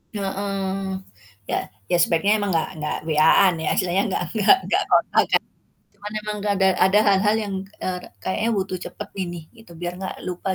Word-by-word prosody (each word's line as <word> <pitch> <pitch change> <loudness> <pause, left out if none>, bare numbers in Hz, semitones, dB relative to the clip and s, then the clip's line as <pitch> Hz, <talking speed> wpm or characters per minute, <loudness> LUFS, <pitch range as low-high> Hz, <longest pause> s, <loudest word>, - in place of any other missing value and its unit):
Heeh. 195 -1 -2 0.5
Ya - - 0 0.3
ya, - - +4
sebaiknya 170 +5 +3
emang 200 - -1
nggak 165 -2 0
nggak 150 - -2
WA-an 160 +4 +5
ya, - - 0
istilahnya 185 +1 +1
nggak 180 - -1
nggak 220 - +6
nggak - - +2
kontakan, - - +3 0.5
cuman 205 +1 -8
emang 210 0 -4
nggak 205 0 0
ada 190 0 +4 0.2
ada 200 +2 +4
hal-hal 200 +2 +3
yang, 200 -2 -4 0.3
eee, 185 -1 -2
ka - - -12 0.2
kayaknya 225 +4 0
butuh 190 -2 -2
cepet 210 - -8
ini 175 -2 -3 0.2
gitu, 200 -7 -15
biar 175 +1 -4
nggak 190 - -5
lupa 185 +1 -3
190 Hz, 175 wpm, -23 LUFS, 180-200 Hz, 0.5 s, nggak